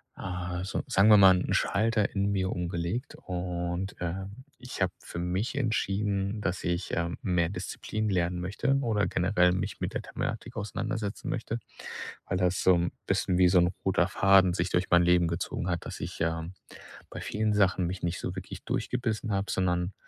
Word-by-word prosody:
äh, 90 -1 -4
so 95 - -2
sagen 100 +3 +4
wir 105 - +9
mal, 95 -2 +8
'n - - -1
Schalter 110 +1 +2
in 100 +1 +1
mir 95 -1 0
umgelegt. 90 +8 -3
Und, 90 +1 -3
ähm, 95 +7 -5 0.2
ich 125 -5 -8
habe 90 -1 +2
für 85 - -7
mich 90 +8 -1
entschieden, 105 -4 0
dass 95 -1 -2
ich, 85 +1 -1
ähm, 85 0 -2
mehr 90 -3 +1
Disziplin 105 +3 -3
lernen 90 -1 0
möchte 100 +9 0
oder 110 -5 +1
generell 90 0 +3
mich 90 +1 -3
mit - - -3
der - - -2
Thematik 120 +2 -5
auseinandersetzen 105 0 -3
möchte, 115 0 -3 0.7
weil 90 - -1
das 90 0 +1
so 95 - +6
'n 85 0 0
bisschen 90 - +1
wie 90 -1 +6
so 90 -1 +5
'n 90 +1 +3
roter 95 -2 +3
Faden 95 -2 +5
sich 85 0 -1
durch 90 +1 +1
mein 85 0 +6
Leben 90 -1 +4
gezogen 85 +1 -3
hat. 85 -1 -2
Dass - - -6
ich, - - -6
ähm, 80 +2 -1 0.6
bei - - -6
vielen 105 0 0
Sachen 95 -3 +3
mich 90 +2 -4
nicht 85 0 -2
so 90 - -4
wirklich 95 -1 -7
durchgebissen 115 -3 -2
habe, 100 -1 -1
sondern, 90 0 0
95 Hz, 180 wpm, -29 LUFS, 90-100 Hz, 0.7 s, wir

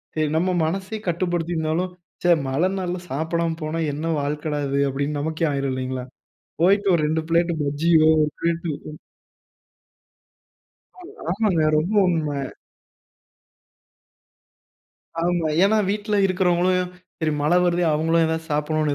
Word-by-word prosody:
சரி. 155 -1 +1
நம்ம 185 +2 +1
மனசே 190 +6 -3
கட்டுப்படுத்தி 175 -1 -1
இருந்தாலும் 160 +3 -1 0.3
ச்சே! 175 - +4 0.2
மழ 135 +5 0
நாள்ல 180 -1 -3
சாப்பிடாம 165 +4 -1
போனா 155 +2 -2
என்ன 150 +3 -4 0.2
வாழ்க்கடா! 150 +1 -2
இது 140 +1 0
அப்பிடின்னு 140 +2 -2
நமக்கே 160 +2 -1
ஆயிரும் 140 -1 -1
இல்லேங்களா? 130 0 -4 0.6
போயிட்டு 200 +3 +4
ஒரு 165 - +1
2 160 +1 0
பிளேட் 170 +1 +2
பஜ்ஜியோ 155 +3 +3 0.2
1 150 - 0
பிளேட் 170 0 -1 0.3
ம். 150 - -12 2.0
அ 365 +3 -12
ஆமாங்க 185 -5 +2
ரொம்ப 170 +8 0
உண்மை. 155 -4 -1 2.8
ஆமா. 175 -2 +1 0.2
ஏன்னா 210 +2 +3
வீட்ல 210 +1 -1
இருக்கிறவங்களும், 180 -1 +1 0.3
சரி 160 -2 0
மழ 150 +3 +2
வருதே! 175 0 +1
அவங்களும் 165 +2 +2
ஏதாவது 160 0 -2
சாப்பிடணுன்னு 150 0 0
165 Hz, 125 wpm, -23 LUFS, 150-180 Hz, 2.8 s, ச்சே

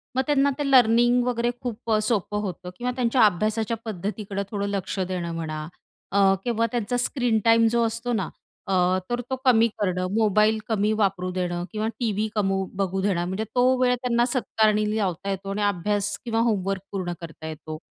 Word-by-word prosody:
मग 260 - +3
त्यांना 280 -1 +3
ते 285 -1 0
लर्निंग 240 0 +5
वगैरे 240 -1 0
खूप 235 -1 -4
अ, 215 - +4
सोपं 210 -2 0
होतं 185 -2 -5
किंवा 250 +1 -2
त्यांच्या 250 0 +2
अभ्यासाच्या 215 +4 0
पद्धतीकडं 200 0 -4
थोडं 200 -2 -2
लक्ष 200 -1 -3
देणं 180 -2 -2
म्हणा 155 -2 -4 0.4
अ, 195 0 +4
किंवा 230 -1 +1
त्यांचा 240 0 -1
स्क्रीन 245 -2 +1
टाईम 230 0 +5
जो 235 0 +2
असतो 230 +2 -2
ना 195 -7 -1 0.4
अ, 195 - -1 0.4
तर 240 0 -1
तो 260 - 0
कमी 230 -3 +5
करणं. 185 -2 0
मोबाईल 215 0 +3
कमी 210 -1 +1
वापरू 185 -2 0
देणं 175 -1 -2
किंवा 215 0 -2
टीव्ही 215 -3 0
कमी 195 -2 +1
बघू 190 -1 -1
देणं. 185 -3 0
म्हणजे 190 +4 -2
तो 255 +1 +4
वेळ 250 -1 +4
त्यांना 240 -1 +1
सत्कारणी 215 -4 +1
लावता 195 -2 -2
येतो 195 0 -4
आणि 210 - -2
अभ्यास 205 +1 0
किंवा 225 -1 0
होमवर्क 195 -2 -1
पूर्ण 185 -3 -3
करता 160 -1 -8
येतो 155 0 -7
210 Hz, 180 wpm, -24 LUFS, 190-235 Hz, 0.4 s, लर्निंग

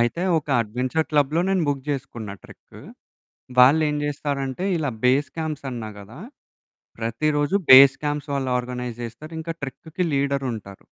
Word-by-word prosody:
అయితే, 120 +9 0 0.2
ఒక 150 - -9
అడ్వెంచర్ 125 +8 -2
క్లబ్‌లో 150 +2 +2
నేను 190 -3 +1
బుక్ 140 -2 -1
చేసుకున్, 120 -6 -5
ట్రెక్కు. - - -15 0.8
వాళ్ళేం 150 +4 +5
జేస్తారంటే, 140 +1 -3
ఇలా 150 -5 -1
బేస్ 135 +3 +3
క్యాంప్స్ 155 -3 -4
అన్నా 115 -3 -6
గదా! 105 +9 -12 0.8
ప్రతిరోజు 145 - 0 0.2
బేస్ 135 +1 +9
క్యాంప్స్ 145 0 -2
వాళ్ళు 135 -2 -1
ఆర్గనైజ్ 125 -1 -5
జేస్తారింకా 155 +8 -6
ట్రెక్కుకి 160 +6 -4
లీడరుంటారు. 135 -8 -2
140 Hz, 125 wpm, -23 LUFS, 125-150 Hz, 0.8 s, బేస్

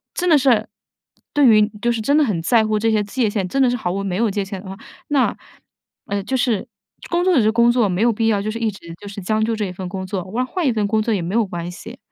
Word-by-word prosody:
真 360 - -1
的 330 - +6
是， 245 -6 +2 0.7
对 290 -2 +4
于 215 -3 +6
就 240 - +2
是 230 -1 -2
真 285 +7 +2
的 305 - +5
很 200 -10 -1
在 220 +6 +3
乎 215 0 0
这 225 +1 +1
些 215 -1 +2
界 220 +2 -1
限， 200 -3 -2
真 275 +9 0
的 255 - +4
是 245 - 0
毫 180 -6 -2
无 195 +2 -3
没 190 -2 -2
有 220 +1 +1
界 200 0 -1
限 195 -1 -7
的 190 - -11
话， 190 - -6 0.3
那， 280 -3 +1 0.7
呃， 200 -1 -2
就 260 +6 -2
是 245 -3 0 0.4
工 345 +1 +1
作 370 -2 +3
就 255 - +5
是 215 - +3
工 235 +1 +4
作， 240 -4 +2
没 180 +1 -1
有 235 +1 +4
必 225 +1 -1
要 210 -3 +2
就 215 - -3
是 225 - -4
一 225 -2 -1
直 170 -4 -12
就 205 - -10
是 200 0 -7
将 215 +3 0
就 225 0 -1
这 215 - -2
一 185 - -5
份 185 0 -6
工 190 0 -5
作， 185 -2 -3
换 225 +7 -2
换 350 +5 -3
一 - - +3
份 210 -2 0
工 220 +1 +1
作 225 - 0
也 195 - -1
没 180 +6 -3
有 230 -2 +3
关 175 -2 -5
系。 230 +8 -10
215 Hz, 320 characters per minute, -20 LUFS, 195-240 Hz, 0.7 s, 的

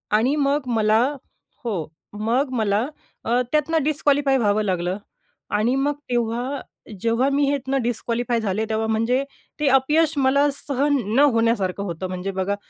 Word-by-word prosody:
आणि 250 +7 +2
मग 280 -2 0
मला 215 0 +3 0.6
हो. 195 -10 -2 0.4
मग 260 +4 +2
मला 210 +1 +1 0.4
अ, 240 +2 +2
त्यातनं 310 0 +1
डिस्क्वालिफाय 285 -2 +2
व्हावं 215 -2 +2
लागलं 180 -1 -1 0.6
आणि 230 +5 +1
मग 280 +2 +1 0.2
तेव्हा 240 +3 -1 0.4
जेव्हा 230 +3 +2
मी 280 +1 +2
ह्यातनं 270 -1 -1
डिस्क्वालिफाय 235 0 -1
झाले, 215 +1 -1
तेव्हा 220 0 -1
म्हणजे 230 +4 +1 0.4
ते 300 - +1
अपयश 295 +4 +3
मला 280 +2 +3
सहन 285 +1 0 0.2
न - - +4
होण्यासारखं 210 -4 +1
होतं. 180 0 -4
म्हणजे 185 +1 -4
बघा, 190 +1 -1
240 Hz, 140 wpm, -22 LUFS, 215-275 Hz, 0.6 s, न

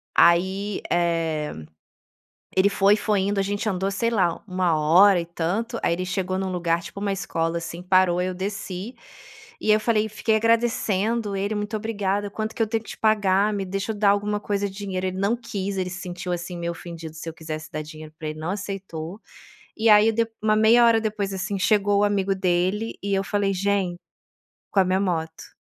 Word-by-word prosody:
Aí, 190 +4 +3
eh, 165 -3 0 1.0
ele 190 +2 +5
foi 200 +1 +4
foi 205 -2 +1
indo 200 +1 0
a - - +3
gente 205 +3 -2
andou, 190 0 -1
sei 230 +4 0
lá, 185 -7 +1
1 180 -3 +1
hora 175 +5 +6
e - - -6
tanto, 195 +8 -2
aí - - +2
ele 180 +2 -3
chegou 185 0 -2
num 190 0 -2
lugar 170 -1 0
tipo 200 - -9
uma 200 -1 -1
escola, 165 -3 -2
assim, 170 +1 -7
parou, 180 -1 +3
eu 185 0 -1
desci, 195 +2 -5 0.7
e 215 - +2
eu 215 - +5
falei 215 -1 +1
fiquei 220 +1 0
agradecendo 230 -2 +1
ele: 200 +2 -1
"Muito 210 +1 -2
obrigada, 205 -2 -2
quanto 220 +1 -4
que - - -3
eu - - -1
tenho 225 +1 -1
que - - -13
te - - -9
pagar? 210 -1 +2
Me 200 -1 -2
deixa 195 +3 -3
eu 210 - -9
dar 205 -1 +4
alguma 205 +1 +1
coisa 205 -1 -1
de 190 - -13
dinheiro". 195 -2 -3
Ele 185 0 -4
não 200 +4 +2
quis, 200 -4 -4
ele 185 -1 -1
se 185 +1 -7
sentiu, 180 0 -5
assim, 175 +1 -5
meio 170 0 -2
ofendido 165 -2 -9
se 165 +1 -6
eu 160 - -8
quisesse 160 -1 -7
dar 155 - -3
dinheiro 155 0 -11
pra 155 - -5
ele, 155 0 -7
não 160 +3 -3
aceitou. 195 -2 -6 0.6
E 225 +1 +2
aí, 210 +1 +7
dep 230 0 0
uma 215 0 +3
meia 225 +2 +6
hora 225 -1 +4
depois, 210 -2 -2
assim, 190 +1 -3
chegou 205 0 +3
o - - +4
amigo 200 -1 +1
dele 190 +4 0
e 200 0 -2
eu 195 - +1
falei: 200 +1 0
"Gente", 190 -2 0 0.7
com 200 - +2
a 185 - +2
minha 185 +1 +1
moto. 160 -4 -3
195 Hz, 205 wpm, -24 LUFS, 180-210 Hz, 1.0 s, aí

